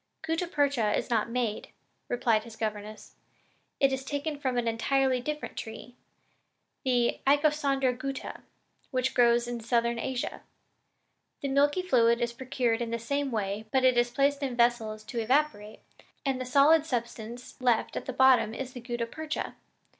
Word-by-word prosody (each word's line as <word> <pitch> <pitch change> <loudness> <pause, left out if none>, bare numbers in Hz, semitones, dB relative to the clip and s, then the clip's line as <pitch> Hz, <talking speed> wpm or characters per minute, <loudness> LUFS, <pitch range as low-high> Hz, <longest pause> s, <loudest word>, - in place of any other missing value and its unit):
"Gutta 330 +2 -1
percha 280 -9 +1
is - - -4
not 230 0 +1
made," 230 -3 -2 0.4
replied 230 -3 +1
his 230 -1 -11
governess, 215 -1 -5 0.7
"and 275 -1 +4
it - - -1
is 265 0 -3
taken 285 +2 -3
from 260 -3 -1
an 240 -1 0
entirely 255 +3 +1
different 300 +3 -4
tree, 225 +2 -8 0.9
the 245 -2 +1
Icosandra 280 -2 +3
gutta, 270 +1 -5 0.5
which 255 0 0
grows 235 0 +4
in 240 -1 -4
Southern 235 0 +1
Asia. 255 +1 -3 1.0
The 280 - -2
milky 290 +6 +2
fluid 235 -8 +3
is 235 -1 -1
procured 245 -2 -1
in 235 - -2
the 230 - -1
same 280 +4 -2
way, 215 -2 -3
but 265 -1 +2
it 255 -1 +5
is 240 0 +3
placed 280 +3 +1
in 265 -3 -2
vessels 235 -3 +1
to 235 +2 -5
evaporate, 225 -3 0 0.4
and 265 -2 0
the - - -3
solid 285 +4 +5
substance 240 -3 -5
left 245 -3 +1
at - - -5
the - - -1
bottom 250 -4 +4
is 260 0 -5
the 245 - -8
gutta 240 -1 -3
percha. 315 +6 -5
245 Hz, 160 wpm, -28 LUFS, 230-275 Hz, 1.0 s, it